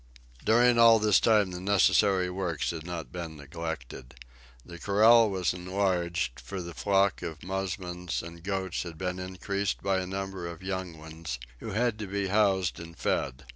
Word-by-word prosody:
During 120 +2 +4
all 115 -1 +8
this 105 -2 +4
time 105 -4 +3
the 90 0 -6
necessary 95 -1 +3
works 90 -4 -2
had 80 0 -7
not 85 -7 -5
been 85 -3 -6
neglected. 70 -4 -7 0.5
The 85 -1 -10
corral 110 +4 +5
was 95 -3 0
enlarged, 90 -7 -1
for 65 +9 -6
the 85 -1 -6
flock 100 +1 +2
of 80 -4 -6
musmons 90 -2 -3
and 85 0 -10
goats 95 -1 -2
had 85 -2 -7
been 90 0 -3
increased 100 +2 -3
by 95 -1 +1
a 90 - -4
number 95 -2 -4
of 85 +1 -8
young 95 -3 -4
ones, 80 -4 -7 0.2
who - - -6
had 115 0 0
to 105 - -4
be 100 0 -2
housed 95 -4 +2
and 85 -1 -10
fed. 70 +1 -2
90 Hz, 170 wpm, -28 LUFS, 85-100 Hz, 0.5 s, all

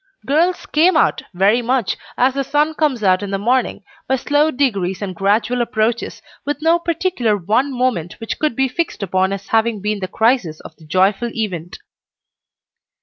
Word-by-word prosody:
Girls 335 +6 +1
"came 325 +3 +3
out" - - +2
very 200 +6 +3
much, 245 -3 0 0.2
as 255 +1 +3
the 275 0 -1
sun 295 +3 +1
comes 290 -8 0
out 185 -1 +3
in 205 - -4
the 195 - -1
morning, 245 +6 0 0.2
by 265 - +2
slow 290 +4 +2
degrees 200 - -1
and 200 -3 -4
gradual 210 +7 +1
approaches, 235 0 -1 0.2
with 290 -1 -3
no 325 +2 +3
particular 335 - 0
one 220 +9 0
moment 245 -10 -2
which 225 - -5
could 305 -6 0
be 270 +2 +2
fixed 260 -4 -3
upon 190 0 +1
as 195 0 -6
having 225 -1 +1
been 210 +1 -2
the 185 - -3
crisis 220 -8 +1
of 155 - -12
the 160 - -17
joyful 195 +7 +2
event. 180 -6 -4
235 Hz, 175 wpm, -18 LUFS, 195-275 Hz, 0.2 s, came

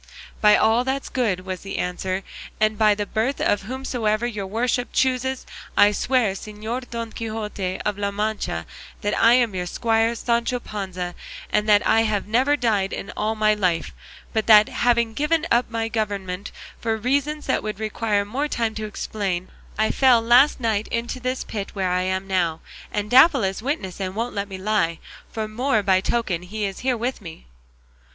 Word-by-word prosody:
"By 210 -1 +7
all 225 +3 +3
that's 265 +1 -2
good," 220 -8 0
was 185 -1 -5
the 195 - -6
answer, 185 +1 -2 0.4
"and 215 0 +2
by 210 -1 +4
the 205 0 -2
birth 225 +7 -1
of 205 - +1
whomsoever 235 -1 -1
your 210 -5 -3
worship 245 +4 -1
chooses, 260 0 0 0.3
I 205 - +7
swear, 235 -1 +1
Señor 220 +5 -6
Don 230 -1 -5
Quixote 210 -5 -4
of 205 -1 -1
La 200 0 0
Mancha, 205 - -2 0.4
that 205 - -1
I 230 +1 +5
am 240 -4 +3
your 180 -1 -3
squire 225 +3 +1
Sancho 235 +1 0
Panza, 185 -5 -5 0.4
and 210 0 +1
that 205 -1 +5
I 225 - +4
have 215 -3 0
never 255 +7 +2
died 205 -5 -1
all 215 +1 -1
my 215 0 +3
life; 180 -6 0 0.4
but 220 -1 0
that, 215 -1 +8
having 235 -2 +1
given 310 +5 +1
up 240 +1 +3
my 225 -1 -2
government 200 -4 -3 0.3
for 225 -1 -1
reasons 285 +6 -1
that - - +1
would 215 -1 -5
require 215 -1 0
more 265 +8 -2
time 230 -6 -1
to 215 0 -4
explain, 195 -4 -3 0.3
I 220 0 +2
fell 255 -3 +5
last 245 +6 +5
night 220 -3 0
into 235 +2 -3
this 255 +1 -2
pit 205 -2 -6
where 190 -2 0
I 180 0 +1
am 190 +1 -1
now, 175 -4 0 0.3
and 210 0 -2
Dapple 265 +2 +6
is 190 +2 -1
witness 220 - -3
and 190 -1 -3
won't 235 +3 -2
let 200 0 -3
me 190 - -6
lie, 185 -4 0 0.3
for 220 -1 -3
more 225 0 0
by 190 -2 +3
token 200 -6 -1
he 205 +4 -4
is 195 -1 -4
here 255 -1 0
with 240 +1 -3
me." 165 - -10
215 Hz, 180 wpm, -23 LUFS, 200-240 Hz, 0.4 s, that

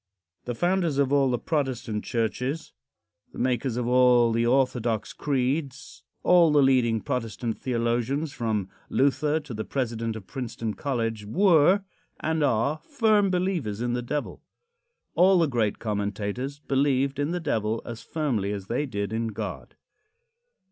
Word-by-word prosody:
The 120 - -3
founders 175 -2 +1
of 140 -1 +2
all 140 -2 +4
the 125 - +1
Protestant 130 -8 -2
churches 125 +6 -2 0.6
the - - -12
makers 125 -1 0
of 125 - -1
all 125 -1 +5
the 115 +1 +1
orthodox 120 -4 +1
creeds 140 0 -2 0.2
all 175 -3 +5
the 145 -1 +5
leading 120 -4 +3
Protestant 115 0 -3
theologians, 125 +4 -1
from 110 -5 -1 0.2
Luther 140 +3 +2
to 145 -4 -9
the 110 0 -3
president 115 -4 -2
of 110 -4 -8
Princeton 115 -3 -4
College 115 -6 -2
were, 185 - +4 0.4
and 160 -1 0
are, 140 +4 +1
firm 220 -8 +3
believers 180 - -1
in 120 0 -1
the 125 - -1
Devil. 145 +4 -4 0.7
All 185 +1 +5
the 170 - +4
great 115 -6 0
commentators 105 +5 -3
believed 140 -1 0
in 145 +1 0
the 175 +1 -1
Devil 115 -8 -1
as 115 -1 -7
firmly 125 -11 -1
as 100 -2 -5
they 135 +8 -1
did 100 -3 -3
in 115 +1 -1
God. 110 - -6
125 Hz, 145 wpm, -26 LUFS, 115-145 Hz, 0.7 s, all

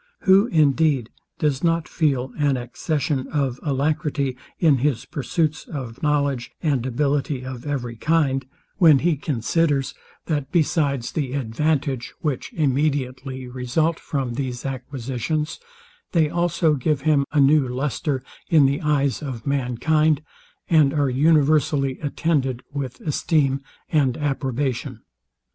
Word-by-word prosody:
Who 195 +3 +5
indeed 150 - +2 0.3
does 145 -2 0
not 165 -1 +1
feel 135 -5 0
an 145 -3 +1
accession 135 +3 -2
of 135 -4 -1
alacrity 145 -1 -1 0.2
in 150 -6 +4
his 135 -3 0
pursuits 155 +3 -1
of 130 -5 -7
knowledge 145 -5 0
and 140 -7 +1
ability 140 0 -1
of 130 +1 -7
every 125 -5 -3
kind, 140 -1 +1 0.3
when 160 -7 +7
he 165 +3 +2
considers, 145 +1 0 0.3
that 145 -3 -2
besides 150 -7 +1
the 135 -5 -2
advantage, 135 0 -1
which 150 -7 -2
immediately 135 -3 -1
result 130 +6 -1
from 135 -5 -3
these 125 -1 -4
acquisitions, 135 +3 -3 0.5
they 160 -4 +3
also 170 -2 +2
give 145 0 0
him 150 -1 +3
a 150 - +2
new 140 0 +5
lustre 135 +1 -2 0.3
in 155 -4 +6
the 140 +1 +1
eyes 145 -2 +1
of 130 -6 -6
mankind, 140 +3 +1 0.4
and 155 -3 +4
are 140 -3 +2
universally 145 -1 +3
attended 140 -4 -1
with 135 -3 -4
esteem 145 -3 +1 0.3
and 135 -6 +2
approbation? 135 -3 -2
140 Hz, 120 wpm, -23 LUFS, 130-155 Hz, 0.5 s, when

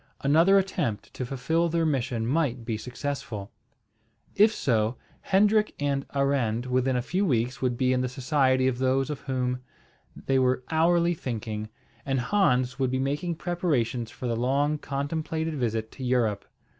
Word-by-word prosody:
Another 165 +8 +5
attempt 120 - -1
to 130 - -4
fulfil 160 +7 0
their 165 0 +1
mission 125 -6 -1
might 130 -3 0
be 115 -1 -2
successful. 120 -3 -5 0.8
If 210 +2 +6
so, 115 - 0 0.2
Hendrik 210 +2 +3
and 140 -1 -1
Arend 130 -4 +1
within 130 +1 +1
a 125 - 0
few 185 +9 0
weeks 125 - 0
would 125 -2 0
be 130 0 +2
in 125 - +1
the 125 - -1
society 130 0 +2
of 125 -2 -1
those 130 +2 +1
of 150 - -4
whom 125 -2 -1 0.6
they 135 -1 0
were 130 0 +2
hourly 170 +2 +3
thinking, 110 -7 -4 0.3
and 135 -1 0
Hans 125 -5 +1
would 130 -1 +1
be 130 - 0
making 145 +6 -1
preparations 150 -10 -1
for 125 - -8
the 120 -1 0
long 140 +5 +1
contemplated 160 +3 -3
visit 115 -5 -2
to 130 - -9
Europe. 120 -5 +1
130 Hz, 155 wpm, -27 LUFS, 125-155 Hz, 0.8 s, If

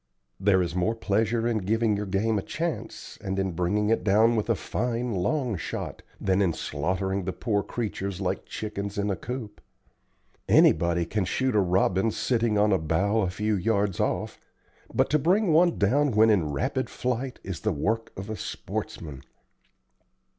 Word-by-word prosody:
There 95 -2 +3
is 85 -1 -3
more 90 +6 0
pleasure 115 +2 0
in 115 -2 +1
giving 110 +2 +1
your 100 0 -3
game 105 +3 +1
a - - -3
chance, 165 - -5
and 95 0 -2
in 95 -1 0
bringing 90 +5 0
it 115 - +1
down 110 +3 +4
with 110 +1 -1
a 115 - +3
fine 120 +3 -2
long 120 - 0
shot, - - -5 0.2
than 95 0 +1
in 90 -4 +2
slaughtering 95 +7 -2
the 95 - -1
poor 105 0 -1
creatures 100 -3 -4
like 95 -1 -2
chickens 100 -2 -5
in 100 0 0
a - - 0
coop. 115 -1 -7 0.9
Anybody 85 0 +4
can 100 +3 -1
shoot 130 +5 0
a - - +5
robin, 95 +2 +2
sitting 115 -2 0
on 105 0 +4
a 95 - +3
bough 95 +8 +1
a 95 - 0
few 105 +3 -1
yards 100 -1 0
off, - - -1 0.5
but - - +1
to 150 - +4
bring 180 +4 +3
one 170 +2 +4
down 135 +7 +2
when 110 +1 +5
in 90 -8 +2
rapid 70 - -1
flight 125 +1 -3
is 95 -3 -5
the 110 - 0
work 110 +8 -1
of 95 +1 -6
a 110 - -4
sportsman. 75 -8 -5
105 Hz, 175 wpm, -26 LUFS, 95-115 Hz, 0.9 s, a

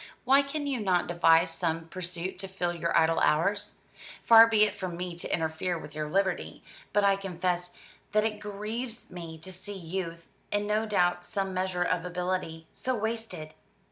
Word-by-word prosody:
Why 270 +2 +6
can 285 +1 -4
you 275 -3 -1
not 185 -4 +2
devise 170 0 +4
some 165 -2 -1
pursuit 180 0 -5
to 195 - -2
fill 180 -2 -2
your 170 0 0
idle 165 0 +4
hours? 195 +7 +1 0.4
Far 225 0 +9
be 220 -2 +4
it 215 - +2
from 180 -3 -5
me 180 -1 -4
to 170 - -5
interfere 165 +2 -1
with 150 -2 -9
your 155 0 -3
liberty; 190 +2 -1 0.3
but 205 - +3
I 200 0 +5
confess 180 -2 -2 0.4
that 215 0 +3
it 215 -1 -2
grieves 215 +4 -5
me 170 -3 -7
to 160 +4 -8
see 195 +3 -7
youth, 170 -1 -5 0.3
and 205 0 +1
no 215 +1 0
doubt 175 -4 +2
some 195 0 -2
measure 185 -1 0
of 175 -1 0
ability, 180 -2 -3
so 255 0 -1
wasted. 220 -8 -4
185 Hz, 175 wpm, -29 LUFS, 170-210 Hz, 0.4 s, Far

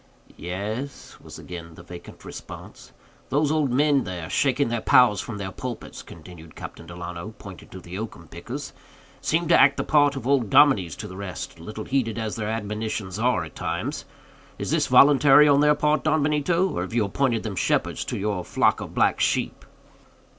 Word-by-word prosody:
"Yes," 105 - -6
was - - -11
again 85 -2 -9
the 85 - -13
vacant 90 0 -12
response. - - -10 0.4
"Those 145 +1 +1
old 155 -4 +1
men 140 +1 +3
there, 90 -2 -6
shaking 135 +4 +1
their 115 -1 -2
pows 120 -6 +5
from 110 -4 -7
their 95 -1 -5
pulpits," 125 +3 -7
continued 80 -1 -13
Captain 85 - -9
Delano, 90 +4 -7
pointing 95 -3 -12
to 95 - -10
the 90 +2 -8
oakum 110 0 -7
pickers, - - -7 0.5
"seem 165 +2 0
to - - +6
act 140 0 +5
the - - -1
part 145 -2 +3
of 130 -4 -6
old 130 -5 +2
dominies 130 - +4
to - - -7
the 95 - -10
rest, 95 -4 -7
little 105 +6 -7
heeded 125 -5 -1
as 110 -2 -3
their 110 -1 -3
admonitions 105 -2 -4
are 115 -6 +1
at 80 - -11
times. - - -4 0.5
Is - - -4
this - - +1
voluntary 145 +1 +6
on 140 -1 +5
their 150 0 +4
part, 150 0 +1
Don 155 -1 +2
Benito, 150 +5 +1
or 90 - -3
have 95 +5 -5
you 115 -3 +2
appointed 115 +2 0
them 105 -3 -4
shepherds 85 - 0
to - - -4
your 100 -3 -2
flock - - +1
of - - -8
black - - +2
sheep?" - - 0
110 Hz, 185 wpm, -24 LUFS, 95-140 Hz, 0.5 s, to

